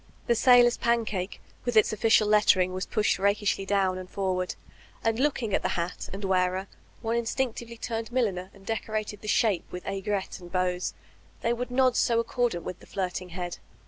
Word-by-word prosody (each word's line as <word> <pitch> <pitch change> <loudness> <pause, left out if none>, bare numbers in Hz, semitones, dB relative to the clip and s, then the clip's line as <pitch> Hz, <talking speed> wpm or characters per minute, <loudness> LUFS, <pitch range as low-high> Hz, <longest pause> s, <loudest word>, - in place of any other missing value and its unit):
The 235 - +3
sailor's 245 +1 +6
pancake 220 -5 -1 0.2
with 245 -2 0
its 215 - +5
oflScial 220 0 +4
lettering 205 -3 +4
was 185 0 -3
pushed 210 -3 +1
raldshly 200 0 +1
down 190 -2 +1
and 185 0 -9
forward, 185 -2 -1 0.5
and 225 0 +1
looking 260 -7 0
at - - +1
hat 170 +1 -2
and 195 +1 -5
wearer, 185 0 +1 0.4
one 225 +1 0
instinctively 235 0 -2
turned 225 0 -4
milliner 195 -7 0
and 195 -1 -18
decorated 215 -1 -3
the 215 - -8
^shape 210 -4 +3
with 180 - -7
aigrette 195 0 -2
and 175 -1 -12
bows, 180 -1 -1 0.2
— - - -29
^they 235 +1 +2
would 245 +1 -4
nod 255 0 +3
so 230 -1 +3
accordant 230 -6 0
with 180 - -6
the - - -16
flirting 185 -1 -3
head. 175 0 -5
205 Hz, 175 wpm, -27 LUFS, 185-230 Hz, 0.5 s, sailor's